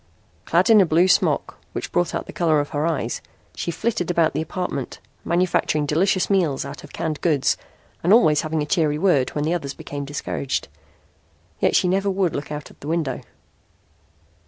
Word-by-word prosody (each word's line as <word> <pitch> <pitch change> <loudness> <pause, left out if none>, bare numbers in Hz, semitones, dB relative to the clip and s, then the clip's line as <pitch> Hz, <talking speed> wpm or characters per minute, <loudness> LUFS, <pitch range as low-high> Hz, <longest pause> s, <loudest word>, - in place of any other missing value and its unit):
Clad - - +3
in 215 -2 +8
a - - +5
blue 170 +3 +4
smock 185 - +1
which - - -4
brought 175 0 0
out - - -3
the - - -10
color 160 -3 +2
of 145 - -2
her 150 +2 -1
eyes, 165 -4 -2 0.3
she - - -3
flitted 180 0 -1
about 170 -2 +2
the 150 - -1
apartment, 160 -4 -4 0.2
manufacturing 170 -3 +1
delicious 180 +5 +2
meals 170 -9 +1
out 140 +1 -8
of 150 - -12
canned 155 -2 -3
goods 150 -6 +2 0.5
and 175 - +2
always 155 -10 +5
having 155 -1 -1
a - - -3
cheery 150 -2 +1
word 150 -7 +2
when 145 - 0
the 160 +3 0
others 140 -6 -3
became 145 0 -6
discouraged. 140 -1 -3 0.9
Yet - - +2
she - - +4
never 195 +2 +1
would 190 -3 0
look 145 +1 -5
out 150 0 -6
the 145 - -9
window. 155 -6 -1
160 Hz, 180 wpm, -22 LUFS, 145-180 Hz, 0.9 s, in